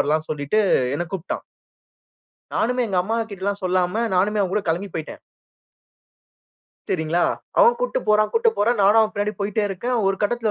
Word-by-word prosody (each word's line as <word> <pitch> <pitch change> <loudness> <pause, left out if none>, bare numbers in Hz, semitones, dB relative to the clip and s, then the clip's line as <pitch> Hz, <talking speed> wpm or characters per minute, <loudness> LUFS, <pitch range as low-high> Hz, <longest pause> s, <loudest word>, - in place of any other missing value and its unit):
வரலாம்ன்னு, 155 +2 0
சொல்லிட்டு 145 +6 -1 0.4
என்னை 175 +4 -2
கூப்பிட்டான். 190 -2 -4 1.1
நானுமே 250 +2 0
எங்க 190 -3 0
அம்மா 220 +5 -2
கிட்டலாம் 200 +1 -3
சொல்லாம 185 +4 +1
நானுமே 205 +3 +2
அவன் 190 -1 -2
கூட 210 - 0
கிளம்பி 175 +5 -1
போய்ட்டேன். 160 -1 -6 1.7
சரிங்களா! 165 0 0 0.3
அவன் 475 0 +6
கூட்டிட்டு - - -1
போறான் 215 0 +3
கூட்டிட்டு 460 0 +2
போறான். 230 +3 +2
நானும் 205 +3 +6
அவன் 220 -1 +1
பின்னாடி 205 +1 -1
போய்ட்டே 205 +1 -1
இருக்கேன். 220 +6 -3
ஒரு 195 0 +1
கட்டத்தில 230 +1 0
200 Hz, 155 wpm, -22 LUFS, 180-220 Hz, 1.7 s, அவன்